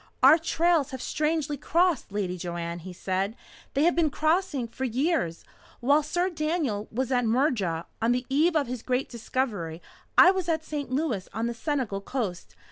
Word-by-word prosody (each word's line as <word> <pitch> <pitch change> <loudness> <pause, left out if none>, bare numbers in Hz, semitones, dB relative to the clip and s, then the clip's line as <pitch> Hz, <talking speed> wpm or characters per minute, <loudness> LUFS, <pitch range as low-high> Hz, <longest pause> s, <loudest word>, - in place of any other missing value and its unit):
"Our 320 - +8
trails 325 -2 +2
have 260 -2 -6
strangely 300 +1 -1
crossed, 340 - +1
Lady 195 -3 -2
Joanne," 170 -1 -4
he 185 +2 -8
said. 190 +4 -2 0.4
"They 280 - +3
have 345 - +4
been 330 -2 +3
crossing 310 -3 0
for 245 +3 -7
years. 255 - 0 0.3
While 285 +5 +4
Sir 350 +5 -1
Daniel 305 -10 -1
was 260 +3 -2
at 245 -1 +2
Murja, 220 - +1 0.2
on 230 +1 +3
the 250 +1 0
eve 310 +5 +2
of 300 -2 +3
his 245 -1 -5
great 255 +2 -1
discovery, 215 -9 -3 0.4
I 365 - +9
was 375 -3 -2
at 315 -1 0
St. 290 -3 -4
Louis 255 - -1
on 225 +1 -1
the 235 - -1
Senegal 235 -6 -2
coast. 200 -6 -4
260 Hz, 175 wpm, -27 LUFS, 210-310 Hz, 0.4 s, I